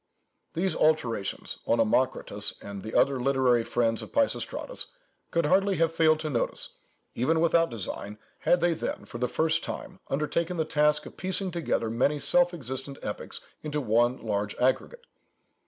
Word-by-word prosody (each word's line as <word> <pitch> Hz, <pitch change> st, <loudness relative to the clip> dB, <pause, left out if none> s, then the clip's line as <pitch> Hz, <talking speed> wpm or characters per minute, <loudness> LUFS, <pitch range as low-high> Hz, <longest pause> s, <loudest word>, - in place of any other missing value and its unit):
These 185 Hz, +3 st, 0 dB
alterations 125 Hz, -10 st, 0 dB
Onomakritus, 115 Hz, +3 st, +2 dB
and 100 Hz, -1 st, -7 dB
the 110 Hz, -, -7 dB
other 140 Hz, -2 st, +3 dB
literary 130 Hz, -3 st, +3 dB
friends 115 Hz, -1 st, 0 dB
of -, -, -9 dB
Peisistratus, 285 Hz, -, -1 dB, 0.4 s
could 170 Hz, -1 st, +1 dB
hardly 195 Hz, +4 st, +3 dB
have 165 Hz, -1 st, +1 dB
failed 155 Hz, -1 st, +4 dB
to 155 Hz, -, -2 dB
notice, 120 Hz, -, -1 dB, 0.4 s
even 160 Hz, +7 st, +1 dB
without 165 Hz, 0 st, +3 dB
design, 105 Hz, -2 st, -5 dB, 0.2 s
had 175 Hz, -, +3 dB
they 175 Hz, 0 st, +3 dB
then, -, -, -4 dB
for 120 Hz, -, -8 dB
the 125 Hz, -, +1 dB
first 160 Hz, +3 st, +1 dB
time, 185 Hz, 0 st, -6 dB
undertaken 155 Hz, +5 st, -1 dB
the 160 Hz, -, +1 dB
task 150 Hz, -1 st, +2 dB
of -, -, -11 dB
piecing 190 Hz, 0 st, -1 dB
together 160 Hz, -9 st, -1 dB
many 130 Hz, +6 st, +2 dB
self 175 Hz, +4 st, +3 dB
existent 135 Hz, -3 st, -3 dB
epics -, -, -5 dB, 0.2 s
into 150 Hz, -1 st, -2 dB
one 120 Hz, 0 st, +2 dB
large 105 Hz, -2 st, -2 dB
aggregate. 305 Hz, -, 0 dB
150 Hz, 155 wpm, -28 LUFS, 120-170 Hz, 0.4 s, failed